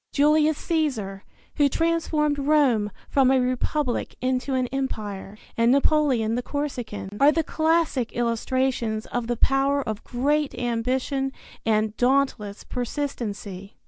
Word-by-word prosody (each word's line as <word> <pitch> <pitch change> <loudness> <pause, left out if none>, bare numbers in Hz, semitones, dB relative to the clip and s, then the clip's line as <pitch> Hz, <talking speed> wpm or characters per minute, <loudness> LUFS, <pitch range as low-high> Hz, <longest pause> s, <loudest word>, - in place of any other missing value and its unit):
Julius 300 +1 +3
Caesar, 240 - -2 0.3
who 290 -2 +4
transformed 310 -2 0
Rome 275 -8 +3 0.2
from 270 -2 +3
a 265 0 +4
republic 255 +1 -1
into 255 +1 -1
an 255 -1 +1
empire, 210 -7 -4 0.2
and 230 +1 +3
Napoleon 275 -5 +2
the 245 - 0
Corsican, 245 -8 -4
are 285 +2 +7
the 325 +1 +1
classic 315 -6 +1
illustrations 235 -1 0
of 245 -1 -3
the 240 0 -1
power 275 +3 +2
of 215 -1 -4
great 285 +4 0
ambition 255 +3 -1 0.4
and 215 -1 +1
dauntless 245 -6 +1
persistency. 220 -7 -5
260 Hz, 120 wpm, -24 LUFS, 230-290 Hz, 0.4 s, are